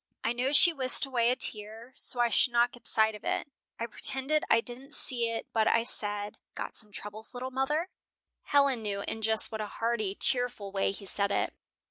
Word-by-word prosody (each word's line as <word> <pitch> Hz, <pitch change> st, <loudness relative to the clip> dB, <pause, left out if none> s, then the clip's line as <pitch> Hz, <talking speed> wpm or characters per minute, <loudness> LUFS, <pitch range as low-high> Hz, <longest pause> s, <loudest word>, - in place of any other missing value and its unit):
I 230 Hz, -, 0 dB
know 250 Hz, +3 st, -1 dB
she 335 Hz, +4 st, +6 dB
whisked 260 Hz, -1 st, +2 dB
away 240 Hz, -3 st, +1 dB
a 250 Hz, -, +2 dB
tear 225 Hz, +1 st, +1 dB
so 245 Hz, -, +2 dB
I 240 Hz, -, +3 dB
should 235 Hz, +3 st, +2 dB
not 240 Hz, 0 st, +3 dB
get 245 Hz, -, -8 dB
sight 220 Hz, 0 st, +3 dB
of 210 Hz, -, -11 dB
it. -, -, -2 dB, 0.3 s
I 230 Hz, -, -2 dB
pretended 270 Hz, +6 st, +1 dB
I 230 Hz, -, +5 dB
didn't 255 Hz, +5 st, 0 dB
see 235 Hz, -3 st, +1 dB
it 230 Hz, 0 st, -4 dB
but 220 Hz, -1 st, +2 dB
I 230 Hz, -, +3 dB
said, 205 Hz, -3 st, 0 dB, 0.2 s
'Got -, -, -6 dB
some 210 Hz, -2 st, 0 dB
troubles, 215 Hz, +4 st, -9 dB
little 255 Hz, +1 st, -5 dB
mother?'" 295 Hz, +6 st, -1 dB, 0.6 s
Helen 280 Hz, -4 st, +2 dB
knew 200 Hz, -2 st, -3 dB
in 225 Hz, -, -5 dB
just 220 Hz, +1 st, +1 dB
what 220 Hz, -1 st, -4 dB
a 210 Hz, -, -4 dB
hearty, 220 Hz, -3 st, -2 dB
cheerful 245 Hz, -6 st, -2 dB
way 195 Hz, 0 st, 0 dB
he 200 Hz, 0 st, -9 dB
said 200 Hz, +1 st, -1 dB
it. -, -, -1 dB
230 Hz, 205 wpm, -29 LUFS, 215-255 Hz, 0.6 s, she